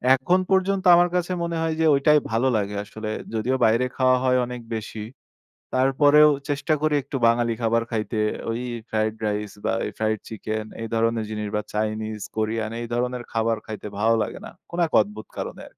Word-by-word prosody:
এখন 175 +8 +2
পর্যন্ত 190 0 +2
আমার 175 +1 +4
কাছে 180 0 0
মনে 170 -1 -2
হয় 165 0 0
যে 160 - +3
ঐটাই 150 +2 +5
ভালো 115 +4 +2
লাগে 105 0 -2
আসলে 110 +1 -7 0.3
যদিও 120 +4 0
বাইরে 115 +3 +3
খাওয়া 130 -1 +4
হয় 130 -1 +3
অনেক 125 0 -7
বেশি। 110 -1 -6 0.7
তারপরেও 145 +3 +5 0.2
চেষ্টা 145 +2 0
করি 155 -1 +2
একটু 140 +1 -5
বাঙালি 115 0 +3
খাবার 115 0 +2
খাইতে 110 0 -2 0.3
ওই 115 +2 -2 0.3
ফ্রাইড 110 0 0
রাইস 105 0 -2
বা - - +1 0.3
ফ্রাইড 110 0 0
চিকেন 110 0 -4 0.2
এই 115 - -4
ধরনের 115 0 +1
জিনিস 105 -1 -3
বা 105 - 0
চাইনিজ 110 0 -2 0.2
কোরিয়ান 110 0 -1
এই 120 - -4
ধরনের 125 0 -1
খাবার 115 0 +1
খাইতে 110 -1 -7
ভালো 110 +2 +3
লাগে 105 - -5
না। - - -8 0.2
কোন 170 - -6
এক 160 - -14
অদ্ভুত 105 +1 -9
কারণে। - - -5
115 Hz, 180 wpm, -24 LUFS, 110-140 Hz, 0.7 s, ঐটাই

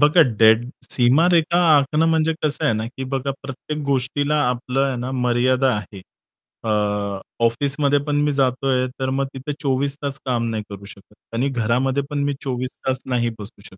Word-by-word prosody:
बघा 150 +4 +6 0.2
डेड 110 +2 +5 0.2
सीमारेषा 165 +7 +3 0.2
आखणं 150 +3 +2
म्हणजे 160 0 +2
कसं 155 +1 0
आहे 145 - +3
ना, 110 +1 -2
की 130 +2 -7
बघा 135 +1 -2
प्रत्येक 140 +3 -6
गोष्टीला 140 +2 0
आपलं 125 +2 -1
आहे 135 -2 -1
ना 125 +2 -4
मर्यादा 125 +1 +2
आहे. 100 -1 -8 0.6
अ, 115 - -2 0.8
ऑफिसमध्ये 140 +4 +1
पण 145 - 0
मी 150 0 +2
जातोय 130 -1 +1
तर 130 0 -1
मग 135 +1 0
तिथे 135 +3 -5
24 140 0 0
तास 140 -1 -4
काम 120 -3 0
नाही 110 -1 -3
करू 100 -1 -9
शकत. 100 +1 -14 0.2
आणि 125 +4 0
घरामध्ये 130 +3 0
पण 145 -1 -1
मी 145 - 0
24 130 -1 -2 0.2
तास 130 0 0
नाही 120 -2 0
बसू 100 -1 -10
शकत, 95 - -14
130 Hz, 175 wpm, -21 LUFS, 120-145 Hz, 0.8 s, बघा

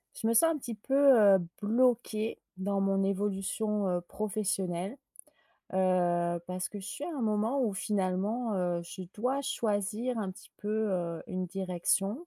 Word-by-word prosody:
Je 225 - -3
me 230 - +3
sens 325 +8 +6
un - - -3
petit 240 -4 -5
peu, 245 +6 -3 0.4
heu, - - +1 0.2
bloquée, 225 -1 +1 0.2
dans 195 +1 -1
mon 195 0 +2
évolution, 200 +1 -1
heu, 180 -1 +1
professionnelle. 195 0 -2 0.8
Heu, 175 -2 +2
parce 185 0 -3
que 205 - -7
je 190 - -8
suis 290 - -5
à 335 - -4
un 260 - -2
moment, 220 +5 +1
où 215 - 0
finalement, 205 +4 -1
heu, 175 -2 0
je 175 +2 -8
dois 255 +6 0
choisir 225 -2 -1
un 200 -3 -2
petit 185 - -14
peu, 205 - -5 0.2
heu, 170 -2 -2
une 185 0 -3
direction. 195 - -1
200 Hz, 160 wpm, -31 LUFS, 185-225 Hz, 0.8 s, sens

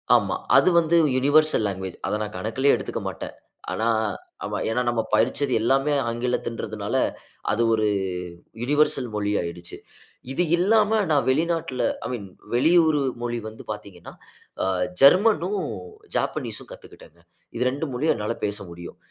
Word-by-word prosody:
ஆமா. - - +2 0.2
அது - - +5
வந்து 165 +1 +1 0.2
யுனிவர்சல் 145 -3 +4
லாங்குவேஜ். 95 -2 -5
அத 105 - 0
நான் 105 -2 -5
கணக்கிலேயே 115 +8 +1
எடுத்துக்க - - -4
மாட்டேன். - - -6 0.4
ஆனா, 115 - -1 0.8
ஏன்னா 125 +3 +1
நாம 115 -2 0
படிச்சது 130 +5 +2
எல்லாமே 135 +5 +2 0.2
ஆங்கிலம்ங்கறத்துனால 120 0 -3 0.6
அது 115 - +1
ஒரு 110 -1 +1 0.8
யுனிவர்சல் 140 -1 +2
மொழி 105 0 -1
ஆயிடுச்சு. 85 0 -6 0.5
இது 175 +6 +1
இல்லாம 210 +3 +3 0.2
நான் 145 -2 +3
வெளிநாட்டில 160 -2 0 0.2
ஐ - - -1
மீன் 100 -5 -5 0.3
வெளியூர் 160 +3 +4 0.2
மொழி 120 0 -2
வந்து 110 - -10
பார்த்தீங்கன்னா, 100 -4 -9 0.5
அ - - +1 0.4
ஜெர்மன். 185 +4 +6 0.7
ஜப்பனீஸ்ஸீம் - - -2
கத்துக்கிட்டேன். 85 +2 -15 0.3
இது 120 - 0
2 145 +3 -3
மொழியும் 145 +3 +1
என்னால 110 +1 -3
பேச 105 0 -1
முடியும். 85 0 -10
125 Hz, 130 wpm, -24 LUFS, 105-155 Hz, 0.8 s, ஜெர்மன்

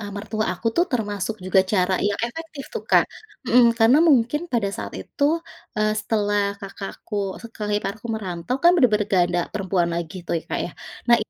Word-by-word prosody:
e 210 - -6
mertua 215 +1 -2
aku 205 - -7
tuh 345 - +5
termasuk 210 -2 -2
juga 185 +1 +4
cara 185 -2 +3
yang 200 - -2
efektif 310 +1 -8
tuh, 460 - -3
Kak. - - +6 0.4
Mhm, 245 +1 +6
karena 230 +6 +6
mungkin 265 +1 +3
pada 225 -5 +1
saat - - -6
itu, 285 - -2 0.5
eee, 215 0 +2
setelah 205 -1 +1 0.2
kakak 195 0 -6
aku 210 - -6 0.3
setelah 215 -2 -5
iparku 215 +3 -5
merantau 185 +2 -3
kan 345 - +8
benar-benar 215 - +3
nggak 185 -2 +4
ada 175 0 +1
perempuan 190 -4 0
lagi 170 0 -4
tuh - - -1
ya, - - -19
Kak, - - -1
ya. - - -8 0.4
Nah, 240 - +8
215 Hz, 185 wpm, -23 LUFS, 195-235 Hz, 0.5 s, kan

